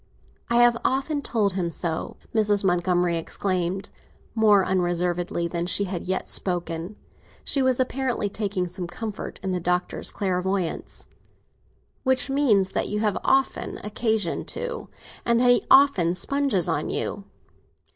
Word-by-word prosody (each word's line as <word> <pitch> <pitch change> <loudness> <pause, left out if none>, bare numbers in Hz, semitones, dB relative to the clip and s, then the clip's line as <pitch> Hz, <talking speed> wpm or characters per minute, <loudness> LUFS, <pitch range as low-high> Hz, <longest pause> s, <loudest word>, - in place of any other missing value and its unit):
"I 235 - +1
have 240 0 +5
often 280 +3 0
told 210 -7 0
him 180 -2 -1
so!" 165 0 -4 0.2
Mrs. 210 -2 +2
Montgomery 175 -2 +2
exclaimed, 185 +2 -2 0.4
more 210 -4 +4
unreservedly 175 -1 0
than 170 0 -3
she 185 +3 +2
had 185 -3 -4
yet 185 +1 -1
spoken. 175 +1 -2 0.5
She 275 - +1
was 260 -1 +2
apparently 255 -4 0
taking 195 -3 -2
some 180 0 -6
comfort 210 +4 -6
in 190 - -1
the 180 - -1
Doctor's 180 +1 0
clairvoyancy. 190 -2 -2 1.0
"Which 260 +1 +1
means 215 -10 +3
that - - -1
you 210 - -2
have 210 -3 0
often 270 0 +1
occasion 215 -3 -1
to, 485 0 -4 0.3
and 235 0 +2
that 245 0 +5
he 245 - +3
often 200 -12 +5
sponges 275 - +1
on - - -1
you. - - -3
195 Hz, 135 wpm, -25 LUFS, 180-235 Hz, 1.0 s, have